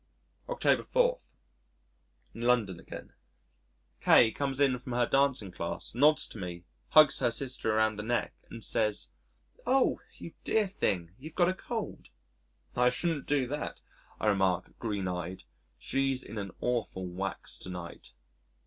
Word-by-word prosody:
October - - +2
4. - - +2 1.1
In 115 - -8
London 115 -7 +2
Again - - -10 0.9
K 115 - +6
comes 135 +2 -2
in 135 -3 +3
from 125 0 -6
her 120 0 +3
dancing 135 -7 +2
class, 85 -1 -4
nods 150 +6 +4
to 110 - -9
me, 90 -2 -6 0.2
hugs 155 -3 +6
her - - +3
sister 125 -2 -1
around 110 -1 +2
the - - -3
neck 120 +3 -1 0.2
and 115 - -8
says, 105 -2 0 0.6
"Oh! 265 0 +3 0.2
you - - -9
dear 220 -1 +2
thing, 90 - -1
you've 155 +4 -10
got 175 -1 +4
a - - +1
cold." 225 +3 -5 0.7
"I 125 0 +4
shouldn't 150 +3 -1
do 145 -3 +2
that," 150 +2 -4 0.4
I - - -2
remark, 95 -3 +2
green 105 -5 -2
eyed, 90 0 -4 0.3
"she's 135 - 0
in 110 0 -6
an 100 -1 -4
awful 115 -6 -1
wax 95 +2 -3
to - - -6
night." 90 -2 -8
120 Hz, 150 wpm, -30 LUFS, 95-140 Hz, 1.1 s, K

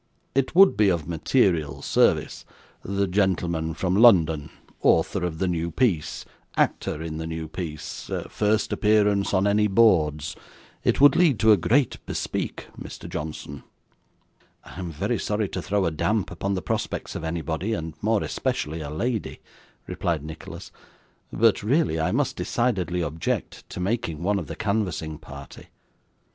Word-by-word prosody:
It 135 +4 0
would 195 +1 +7
be 105 -1 +4
of 85 -5 -1
material 85 - +1
service - - +2 0.4
the 100 +1 -1
gentleman 90 -4 0
from 90 +2 0
London 80 -10 +5 0.3
author 90 +3 +2
of 85 -2 -2
the 95 - 0
new 85 -1 -1
piece 85 -6 0 0.3
actor 80 - 0
in 80 -1 -5
the 80 0 -4
new 80 -1 -4
piece 80 -2 -6 0.2
first 105 +1 0
appearance 105 -2 +2
on 95 0 +2
any 105 +1 +3
boards 80 -8 +3 0.5
it - - +2
would 145 +1 +7
lead 165 -8 +4
to 110 - +6
a - - +8
great 125 - +1
bespeak, - - -3 0.2
Mr. - - -8
Johnson.' 75 -2 -6 1.0
'I - - -11
am 90 -2 -4
very 75 - -2
sorry 105 0 -1
to - - -4
throw 100 -1 0
a 85 - +1
damp 100 +5 0
upon 100 +3 -2
the 90 - -4
prospects - - -3
of - - -5
anybody, 80 +5 -2
and 80 -6 -4
more 110 0 +1
especially 80 +2 -2
a 75 - -5
lady,' 110 - -3 0.5
replied 80 -4 -2
Nicholas; 80 +1 -9 0.6
'but 115 -1 +3
really 120 - +1
I 80 +3 +1
must 140 +4 0
decidedly 90 -8 -1
object 80 +1 -3
to - - -7
making 90 -5 -2
one 100 +2 +1
of 85 - -6
the - - -6
canvassing 90 -8 -2
party. 70 -3 -11
90 Hz, 155 wpm, -25 LUFS, 80-105 Hz, 1.0 s, a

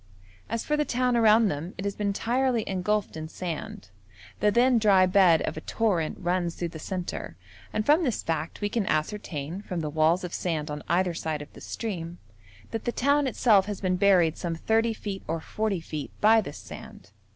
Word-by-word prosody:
As 230 - -2
for 300 - +1
the 300 - +2
town 250 -2 +1
around 225 -1 +5
them, 160 +4 -5
it 190 - -5
has 200 - -1
been 210 - -2
entirely 235 +3 0
engulfed 195 +2 -1
in 155 0 -5
sand; 160 - -6 0.5
the 210 - +4
then 240 +2 +4
dry 195 -4 +5
bed 185 -3 +5
of - - -3
a - - -4
torrent 185 -8 0
runs 175 -1 -1
through 175 - -3
the 160 - -9
centre, 175 - -5 0.3
and 215 - -1
from 305 +6 +4
this 250 -8 -1
fact 165 +3 -3
we 205 - +1
can 215 -2 -1
ascertain, 155 0 -2
from 180 -4 -4
the 150 -1 -3
walls 160 +4 +2
of 180 - -5
sand 155 -4 -2
on 150 0 -5
either 180 0 +2
side 160 -2 -3
of - - -17
the - - -13
stream, 175 -6 -5 0.5
that 225 -1 -4
the 240 - +1
town 280 +3 +2
itself 215 -5 +3
has 205 -2 -4
been 185 -2 0
buried 180 -4 +4
some 170 -2 -3
30 225 +6 +1
feet 200 -3 -6
or 165 +1 -1
40 210 +3 -2
feet 155 -3 -6
by 220 +1 +6
this - - -8
sand. - - -11
190 Hz, 200 wpm, -27 LUFS, 165-220 Hz, 0.5 s, by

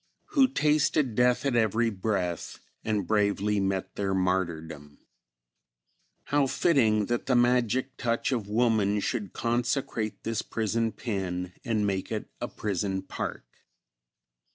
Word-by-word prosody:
"Who 275 -3 +5
tasted 150 - +2
death 125 +3 +2
at 135 -3 +1
every 115 0 +2
breath 95 -4 -2 0.3
And 105 -3 0
bravely 105 0 +1
met 95 -1 -1
their 95 -1 -1
martyrdom." 80 -6 -2 1.3
"How 145 -1 +2
fitting 115 -9 +3
that 120 +5 -2
the 130 - +3
magic 125 +1 +2
touch 115 +1 0
of 115 -6 -1
woman 105 -2 +2
should 105 -2 -3
consecrate 120 -2 -1
this 115 -1 -1
prison 115 +1 -1
pen 90 -6 -3
and 110 -3 0
make 95 -2 -2
it - - -4
a - - -1
prison 95 -1 -2
park! 95 - -5
110 Hz, 125 wpm, -28 LUFS, 95-120 Hz, 1.3 s, Who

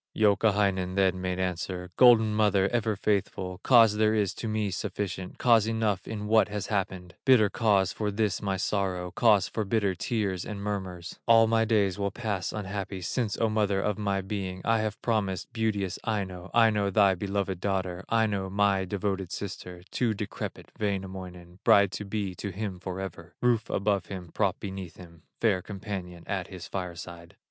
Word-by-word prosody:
Youkahainen 100 -3 +2
then 95 -1 +2
made 90 -1 -2
answer: 90 0 -3
"Golden 115 -4 +6
mother, 105 -3 +3
ever 115 -3 0
faithful, 95 -2 -1
Cause 115 -4 +6
there 110 0 +3
is 100 -4 +1
to 115 - -5
me 110 -2 -1
sufficient, 95 -1 -4
Cause 115 -3 +4
enough 110 -4 0
in 105 -2 -4
what 110 +1 +4
has 105 -1 -4
happened, 95 -3 -2
Bitter 115 -6 +5
cause 100 -5 +2
for 105 -1 -2
this 105 -1 0
my 100 -2 -1
sorrow, 95 -2 -1
Cause 105 -2 +4
for 110 - -2
bitter 100 -1 +1
tears 95 -1 -2
and 105 -1 -6
murmurs: 95 -4 -5
All 115 -1 +7
my 115 0 +2
days 105 -3 +1
will 100 0 0
pass 100 -5 -3
unhappy, 100 -2 -4
Since, 105 +4 -1
O 115 - +3
mother 105 -2 +1
of 105 +1 -1
my 100 -2 0
being, 95 -2 -4
I 115 -1 +3
have 110 0 -2
promised 100 -6 -1
beauteous 105 -4 -1
Aino, 95 -4 -3
Aino, 110 -4 +3
thy 100 0 +4
beloved 95 0 -2
daughter, 95 -2 -2
Aino, 105 -4 +1
my 100 -1 +2
devoted 95 -1 -2
sister, 90 -3 -6
To 115 -4 0
decrepit 100 0 -6
Wainamoinen, 95 -3 -4
Bride 100 -2 +5
to 105 - -5
be 100 -2 -3
to 100 +3 -5
him 95 -1 -5
forever, 95 -2 -6
Roof 120 -2 +1
above 100 -3 0
him, 90 -4 -7
prop 100 -3 0
beneath 95 -4 -7
him, 85 -2 -13 0.2
Fair 100 -5 +2
companion 95 -4 -6
at 95 -3 -3
his 90 -3 -9
fire 90 -3 -4
side." 85 -1 -10
100 Hz, 170 wpm, -28 LUFS, 95-110 Hz, 0.2 s, All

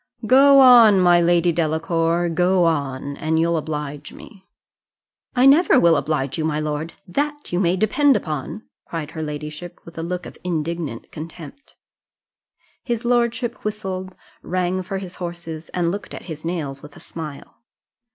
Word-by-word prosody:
Go 275 +3 +7
on, 235 -6 +8
my 175 -1 +5
Lady 175 0 +3
Delacour 165 +1 0
go 180 +2 +2
on, 140 -3 -2
and 160 +1 0
you'll 170 +1 +2
oblige 150 -2 -5
me." 195 -3 -15 0.9
"I 250 +1 +4
never 280 0 +6
will 170 -5 +5
oblige 140 -2 -2
you, - - 0
my 155 -1 -1
lord, 155 +1 -3
that 290 +5 -3
you 175 - +1
may 180 -1 +2
depend 270 +8 +3
upon," 155 - -5 0.2
cried 160 -2 -5
her 160 - -6
ladyship, 150 +3 -7
with 170 0 -10
a - - -2
look 180 +2 -4
of - - -11
indignant 165 -6 -4
contempt. 165 - -10 1.1
His 240 -1 -3
lordship 240 0 0
whistled, 190 -3 -4 0.3
rang 185 +1 -1
for 195 +1 -5
his 190 -1 -8
horses, 170 -2 -7
and 170 -2 -1
looked 200 +2 -6
at - - -9
his 155 -3 -8
nails 155 -5 -4
with 150 -1 -13
a - - -13
smile. 155 -4 -9
170 Hz, 155 wpm, -21 LUFS, 155-195 Hz, 1.1 s, on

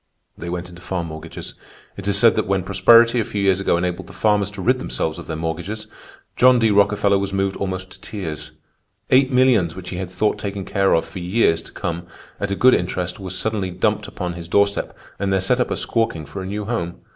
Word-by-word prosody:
They 85 - -7
went 90 0 -4
into 85 -1 -13
farm 85 -2 -3
mortgages. 80 +1 -8 0.4
It 100 0 -7
is 100 -1 +2
said 115 +2 +5
that 110 - 0
when 95 -1 +1
prosperity 115 +6 +5
a - - +2
few 105 - -4
years 95 -1 +3
ago 100 -3 +2
enabled 90 0 -2
the - - -12
farmers 105 -2 +2
to 100 - -6
rid 130 +4 +3
themselves 80 -10 -3
of - - -10
their 80 - -3
mortgages, 85 +7 -4 0.5
John 125 0 +6
D. 115 -2 +3
Rockefeller 100 0 +3
was 100 0 -2
moved 95 0 0
almost 95 -1 -4
to - - -12
tears; 85 -8 -6 0.6
eight 130 +1 +5
millions 125 -10 +3
which 90 -1 -8
he 90 - -4
had 90 0 -4
thought 105 +3 0
taken 100 -1 -4
care 100 -1 +2
of 80 - +1
for - - -8
years 90 -2 +2
to - - -15
come 85 -1 -4 0.3
at 100 - -2
a 100 - -1
good 130 +5 +5
interest 90 0 -1
were 95 -1 -6
suddenly 100 +1 -2
dumped 105 +4 0
upon 90 -2 -4
his 85 -1 -8
doorstep 100 +3 +1 0.2
and 100 0 0
there 95 - +3
set 110 +7 +1
up 125 - +1
a - - -1
squawking 115 -9 -1
for 85 +7 -7
a 95 - -5
new 105 +1 -4
home. 100 -7 -3
95 Hz, 225 wpm, -21 LUFS, 90-105 Hz, 0.6 s, John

